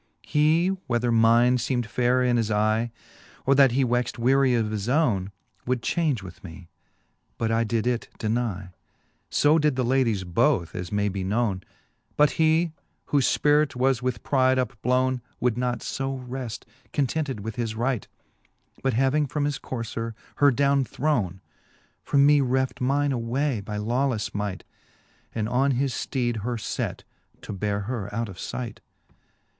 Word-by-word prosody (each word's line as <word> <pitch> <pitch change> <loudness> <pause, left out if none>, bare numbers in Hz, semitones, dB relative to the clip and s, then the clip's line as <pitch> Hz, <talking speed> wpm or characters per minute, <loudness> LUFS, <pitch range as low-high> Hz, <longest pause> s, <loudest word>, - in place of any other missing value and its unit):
He, 155 +4 +3 0.2
whether 120 -1 +1
mine 115 +2 +5
feemM 125 0 -1
fayrer 125 +3 +1
in 120 -1 +3
his 115 -2 0
eye, 110 +2 +1 0.6
Or 135 - +4
that 135 -3 +5
he 135 +1 +2
wexed 120 0 0
weary 130 +1 +3
of 110 -2 0
his 105 +1 -3
owne, 115 - +1 0.4
Would 125 -2 0
change 150 - 0
with 90 - -11
me; 85 -1 -11 0.7
but 115 -1 -1
I 115 +1 +2
did 115 0 -1
it 120 -1 -1
denye 110 -4 -2
j - - -35 0.5
So 150 +2 +4
did 150 -3 +2
the 130 -1 0
ladies 120 -6 +1
both, 85 -1 +1
as 90 -1 -5
may 105 0 +1
be 95 -1 -3
knowne: 100 -1 0 0.6
But 150 -2 +5
he, 160 +1 +2 0.4
whofe 140 -3 +3
Spirit 150 -1 +3
was 130 0 +2
with 125 -2 -2
pride 130 -1 +3
upblowne, 125 +1 0 0.2
Would 120 -2 +1
not 125 0 -1
fb 135 -1 -4
reft 125 -3 -5 0.3
contented 140 -4 -1
with 110 +2 -6
his 115 -2 -2
right, 120 -2 -1 0.7
But 130 -4 0
having 135 +4 +2
from 145 +2 -1
his 145 -1 -2
courier 115 -2 -5 0.2
her 145 - +6
downe 140 +1 +2
throwne, 115 - -1 0.6
From 140 -1 +3
me 145 0 +5
reft 130 0 0
mine 140 +3 +1
away 125 0 -1
by 105 +1 -5
lawlefle 120 +1 -1
might. 100 -3 -3 0.7
And 110 -1 -1
on 130 +4 +2
his 135 -1 0
fteed 120 -3 -1
her 120 +3 -3 0.2
let, - - -3 0.4
to - - -6
beare 100 +1 -2
her 105 -2 -4
out 115 +1 -2
of 95 - -10
light. 120 -4 -5
125 Hz, 160 wpm, -25 LUFS, 110-135 Hz, 0.7 s, her